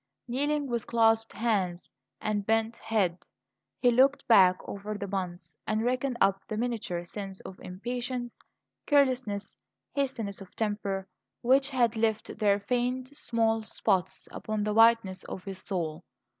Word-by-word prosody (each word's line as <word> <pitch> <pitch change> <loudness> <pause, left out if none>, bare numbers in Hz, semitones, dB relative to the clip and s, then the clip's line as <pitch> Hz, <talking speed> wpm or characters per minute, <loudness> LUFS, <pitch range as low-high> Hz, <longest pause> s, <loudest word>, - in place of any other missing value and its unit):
Kneeling 290 +4 0
with 235 -4 -2
clasped 225 -1 +3
hands 190 -7 0 0.3
and 210 -1 -1
bent 225 +2 +1
head, 190 -6 0 0.6
he 245 - +4
looked 265 +4 +3
back 185 -5 +7
over 205 +1 -5
the 200 0 -4
month, 175 -4 -4
and 215 +1 +1
reckoned 250 +1 0
up 195 0 +3
the 215 - -3
miniature 220 -7 -2
sins 195 +1 -6
of 190 - -10
impatience, 240 +5 -4 0.5
carelessness, 255 -8 +2 0.4
hastiness 235 -8 -2
of 190 -2 -12
temper, 200 -3 -2 0.4
which 265 +3 +4
had 240 -4 +2
left 220 -1 -1
their 205 -2 +3
faint, 250 +4 -1
small 225 -5 +1
spots 190 -3 -1
upon 215 -1 -3
the 210 0 0
whiteness 225 -4 +4
of 185 - -7
his 195 -1 -6
soul. 170 -4 -3
220 Hz, 140 wpm, -29 LUFS, 195-240 Hz, 0.6 s, back